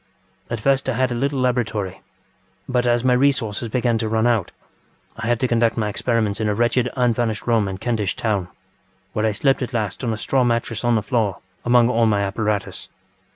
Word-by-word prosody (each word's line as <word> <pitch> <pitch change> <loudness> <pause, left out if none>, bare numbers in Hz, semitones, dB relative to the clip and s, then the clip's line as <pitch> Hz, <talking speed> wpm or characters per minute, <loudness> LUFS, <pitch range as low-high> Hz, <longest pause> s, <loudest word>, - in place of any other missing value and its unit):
At 120 - -3
first 135 +3 +1
I - - +1
had 130 +1 +1
a - - 0
little 135 +3 -1
laboratory, 110 -7 -1 0.7
but 125 -1 +1
as 120 0 +2
my 130 -1 +4
resources 125 -4 +1
began 120 -1 +1
to 110 - -2
run 110 +1 +1
out 115 -6 +1 0.6
I 110 - -5
had 120 -1 +1
to 130 - +2
conduct 115 -1 +2
my 105 -2 0
experiments 110 -1 -1
in 110 - +1
a 105 - 0
wretched 120 +2 +1
unfurnished 120 -3 0
room 115 -4 +2
in 95 -1 -4
Kentish 105 -3 -1
Town, 100 -5 -1 0.7
where 110 +1 +1
I - - +1
slept 135 +7 +1
at 125 - -4
last 110 +2 -2
on 120 - 0
a 110 - -2
straw 130 +5 +1
mattress 115 -2 -1
on 120 -1 +3
the 110 - 0
floor 110 -5 0 0.3
among 120 -1 +4
all 115 -2 +2
my 105 -2 +2
apparatus. 100 -1 -2
115 Hz, 200 wpm, -21 LUFS, 105-125 Hz, 0.7 s, my